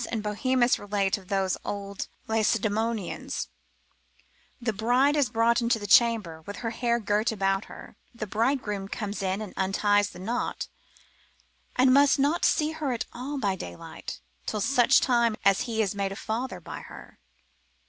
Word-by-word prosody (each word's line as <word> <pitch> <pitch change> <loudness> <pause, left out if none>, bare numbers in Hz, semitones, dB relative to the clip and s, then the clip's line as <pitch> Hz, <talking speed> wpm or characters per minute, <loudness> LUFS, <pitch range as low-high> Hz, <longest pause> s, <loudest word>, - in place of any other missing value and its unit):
and 220 -2 -2
Bohemus 240 +4 +2
relate 200 -1 0
of 190 - -17
those 195 -1 0
old 200 -1 -4 0.2
Lacedaemonians, 220 -1 -1 1.1
the 235 -2 -1
bride 245 +7 +3
is 285 -6 +2
brought 230 +2 +2
into 235 0 +2
the 205 - -7
chamber, 205 -7 +4
with 205 - -5
her 230 - 0
hair 235 0 0
girt 210 +1 +1
about 195 -1 0
her, - - -12 0.2
the 235 -3 -5
bridegroom 210 -2 -1
comes 205 0 -4
in 190 +2 -1
and 205 - -9
unties 205 +1 +2
the - - -12
knot, 225 +7 -3 1.1
and 255 0 +5
must 280 +1 +5
not 290 +5 +1
see 305 0 +3
her 310 -4 -2
at 235 - -2
all 270 +4 -5
by 200 -7 0
daylight, 85 - -8 0.3
till 215 - -1
such 250 +3 +4
time 235 -3 +3
as 195 -1 +5
he 220 -1 +1
is 200 - -1
made 200 -1 -2
a - - -5
father 220 -1 -3
by 175 - -8
her. - - -12
220 Hz, 160 wpm, -27 LUFS, 200-245 Hz, 1.1 s, and